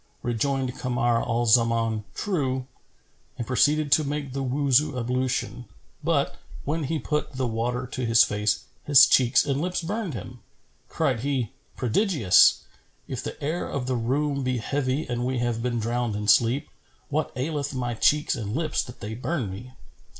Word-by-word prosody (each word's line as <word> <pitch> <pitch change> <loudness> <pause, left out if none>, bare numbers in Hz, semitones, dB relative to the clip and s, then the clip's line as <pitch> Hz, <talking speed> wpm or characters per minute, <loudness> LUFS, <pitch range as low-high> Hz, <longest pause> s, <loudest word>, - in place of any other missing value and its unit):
Rejoined 130 +2 -1
Kamar 120 -2 +1
al 120 +1 0
Zaman, 115 -2 +2
"True," 135 -10 -1 0.7
and 120 - -3
proceeded 145 +4 +2
to 155 - +5
make 145 -2 -4
the 135 - -2
Wuzu 135 +1 +2
ablution; 125 0 -2 0.4
but, 150 -3 0 0.3
when 155 +1 -1
he 160 +4 -1
put 150 +1 -2
the 130 0 -2
water 120 +2 -2
to 130 0 -5
his 115 -1 +6
face, 105 +1 0 0.2
his 145 -3 +8
cheeks 125 +2 +4
and 140 0 -1
lips 180 0 -2
burned 200 - -3
him. 120 +4 -8 0.5
Cried - - 0
he, 130 -2 -1 0.3
"Prodigious! 125 - +4 0.5
If 130 -2 -5
the - - -6
air 160 +5 -2
of 130 -3 -3
the 130 0 -1
room 140 +4 0
be 130 -1 -1
heavy 135 +4 -1
and 120 0 -2
we 130 +1 -1
have 120 -1 -1
been 120 0 -1
drowned 120 0 -1
in 105 0 -4
sleep, 120 +5 +3 0.4
what 150 +2 -1
aileth 140 +1 -2
my 120 -2 -2
cheeks 150 +6 +2
and 105 -1 -4
lips 155 -1 0
that 125 - -10
they 105 +2 -5
burn 125 - -3
me?" 120 +7 -9
130 Hz, 165 wpm, -25 LUFS, 120-145 Hz, 0.7 s, his